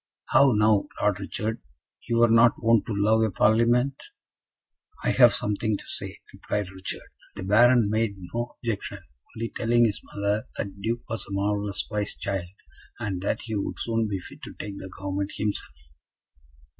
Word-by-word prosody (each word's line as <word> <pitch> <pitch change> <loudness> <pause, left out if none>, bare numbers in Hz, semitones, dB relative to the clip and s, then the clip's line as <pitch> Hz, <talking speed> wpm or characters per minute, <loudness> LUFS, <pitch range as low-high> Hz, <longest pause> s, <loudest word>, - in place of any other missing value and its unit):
"How 135 -2 +6
now, 105 -1 +3
Lord 100 -2 +1
Richard, 110 +3 -3 0.5
you 115 - +2
were 120 0 +6
not 115 +1 +6
wont 115 -1 +3
to 110 - -2
love 110 +2 +3
a 110 - +3
Parlement?" 120 +7 +3 1.0
"I - - +2
have - - +7
something 105 0 0
to - - -12
say," - - -5 0.2
replied 105 -2 -3
Richard. 95 0 -6 0.3
The 100 - -6
Baron 120 +5 +5
made 110 0 0 0.2
no 120 +1 -3
objection, 115 -4 -4 0.4
only 115 +1 -3
telling 120 +1 +3
his 105 -3 -1
mother 100 +1 -2
that 100 - -2
the 100 - -15
Duke 115 +3 -2
was 115 - -3
a - - -11
marvellous 100 0 -1
wise 105 -1 -2
child, 95 -3 -3 0.5
and 95 -4 -3
that 100 - -1
he 110 - -5
would 100 -2 -2
soon 115 -1 0
be 100 -2 -2
fit 90 - -11
to - - -8
take 100 -1 -7
the 95 - -8
government 95 +1 -4
himself. 105 -10 -3
105 Hz, 170 wpm, -26 LUFS, 100-115 Hz, 1.0 s, have